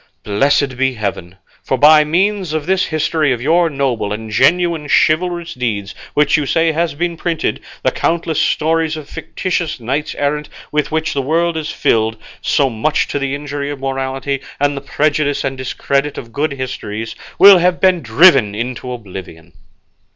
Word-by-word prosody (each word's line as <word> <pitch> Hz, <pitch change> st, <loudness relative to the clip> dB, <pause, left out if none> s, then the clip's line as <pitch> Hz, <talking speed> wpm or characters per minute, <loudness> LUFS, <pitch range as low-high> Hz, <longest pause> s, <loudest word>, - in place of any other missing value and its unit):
Blessed 135 Hz, +5 st, +1 dB
be 130 Hz, 0 st, +1 dB
heaven! 95 Hz, -4 st, -4 dB, 0.3 s
for 130 Hz, -, -1 dB
by 150 Hz, +3 st, +7 dB
means 185 Hz, +2 st, 0 dB
of 155 Hz, -2 st, -2 dB
this 190 Hz, 0 st, +1 dB
history 155 Hz, -2 st, 0 dB
of 120 Hz, -, -4 dB
your 165 Hz, +6 st, +2 dB
noble 135 Hz, -8 st, -1 dB
and 110 Hz, +1 st, -5 dB
genuine 165 Hz, +6 st, +2 dB
chivalrous 170 Hz, +1 st, +1 dB
deeds, 105 Hz, -6 st, -3 dB, 0.2 s
which 150 Hz, +2 st, +3 dB
you 145 Hz, -2 st, -2 dB
say 165 Hz, +2 st, +2 dB
has 160 Hz, -2 st, -1 dB
been 170 Hz, +2 st, -2 dB
printed, 165 Hz, -1 st, -2 dB, 0.2 s
the -, -, +2 dB
countless 165 Hz, -2 st, -1 dB
stories 160 Hz, 0 st, +1 dB
of 150 Hz, -2 st, -9 dB
fictitious 175 Hz, -6 st, -3 dB
knights 135 Hz, +6 st, -3 dB
errant 150 Hz, +1 st, -2 dB, 0.2 s
with 150 Hz, 0 st, -1 dB
which 160 Hz, +1 st, -1 dB
the 140 Hz, -, 0 dB
world 165 Hz, +5 st, 0 dB
is 160 Hz, -1 st, -3 dB
filled, 110 Hz, 0 st, +1 dB, 0.2 s
so 140 Hz, -, +2 dB
much 125 Hz, +5 st, 0 dB
to 145 Hz, -, -2 dB
the 140 Hz, 0 st, -2 dB
injury 145 Hz, 0 st, -5 dB
of 145 Hz, -1 st, -5 dB
morality 135 Hz, +1 st, -3 dB, 0.2 s
and 145 Hz, 0 st, +1 dB
the 140 Hz, -, -5 dB
prejudice 145 Hz, +1 st, 0 dB
and 135 Hz, 0 st, -2 dB
discredit 140 Hz, +2 st, -2 dB
of 115 Hz, -2 st, -8 dB
good 145 Hz, 0 st, -1 dB
histories, 115 Hz, -5 st, -5 dB, 0.2 s
will 195 Hz, 0 st, +9 dB
have 180 Hz, 0 st, +2 dB
been 185 Hz, -2 st, +3 dB
driven 120 Hz, -, +5 dB
into 125 Hz, +2 st, -4 dB
oblivion." 90 Hz, -7 st, -9 dB
145 Hz, 165 wpm, -17 LUFS, 130-160 Hz, 0.3 s, will